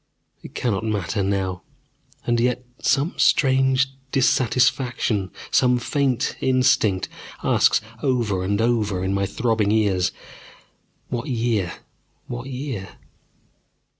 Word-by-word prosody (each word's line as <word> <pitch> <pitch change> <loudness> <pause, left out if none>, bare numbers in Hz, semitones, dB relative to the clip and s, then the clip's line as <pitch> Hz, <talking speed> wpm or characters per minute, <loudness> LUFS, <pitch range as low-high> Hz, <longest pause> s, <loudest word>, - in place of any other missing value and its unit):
It - - -12
cannot 110 -4 -1
matter 105 -2 -1
now. 95 -2 -1 0.6
And 120 -1 +1
yet 125 +1 0 0.2
some 140 +6 +1 0.3
vague 130 -1 +3 0.3
dissatisfaction, 125 -5 +1 0.2
some 125 -1 +4
faint 130 0 0
instinct, 120 -7 +2 0.4
asks - - +3 0.2
over 120 -8 0
and 100 +2 0
over 110 -5 +1
in 95 +1 0
my 100 0 0
throbbing 110 -3 0
ears: 100 -5 +2 1.0
What 120 -1 -3
year? 115 -7 0 0.5
What 120 +2 -6
year? 125 -8 -5
115 Hz, 105 wpm, -23 LUFS, 100-125 Hz, 1.0 s, some